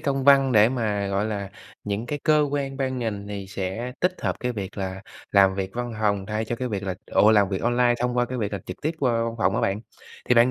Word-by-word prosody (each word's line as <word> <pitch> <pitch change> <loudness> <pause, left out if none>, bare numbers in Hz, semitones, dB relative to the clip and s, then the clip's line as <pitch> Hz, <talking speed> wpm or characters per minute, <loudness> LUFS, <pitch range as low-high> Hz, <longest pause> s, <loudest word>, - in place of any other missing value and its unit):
công 135 -1 -1
văn 135 -2 +6
để 110 0 +6
mà, 110 -5 -1
gọi 100 +1 0
là, 100 -3 -3 0.3
những 105 +3 -3
cái 145 - -3
cơ 150 -1 +4
quan 140 -1 -2
ban 130 -2 -1
ngành 105 -4 -3
thì 100 -2 -5
sẽ 100 +5 -4
tích 180 +1 +2
hợp - - 0
cái 125 0 -1
việc 100 -4 -6
là 95 0 -4 0.3
làm 95 -1 +5
việc 95 -1 -3
văn 120 0 -3
phòng 100 -2 +1
thay 110 +1 -2
cho 120 - -3
cái 125 +1 -3
việc 100 -4 -3
là 95 -2 -2
ủa, 105 - +4
làm 105 -3 +4
việc 95 -1 -3
online 120 0 +3
thông 125 0 0
qua 120 - +3
cái 125 +1 -5
việc 105 -3 -2
làm 100 - -4
trực 90 - -7
tiếp 160 +2 -1
qua 130 -5 +2
văn 115 - -3
phòng 95 -1 +2
á 115 - +1
bạn. 95 +2 0 0.5
Thì 125 - +5
bạn 120 +1 +6
110 Hz, 265 wpm, -24 LUFS, 100-125 Hz, 0.5 s, văn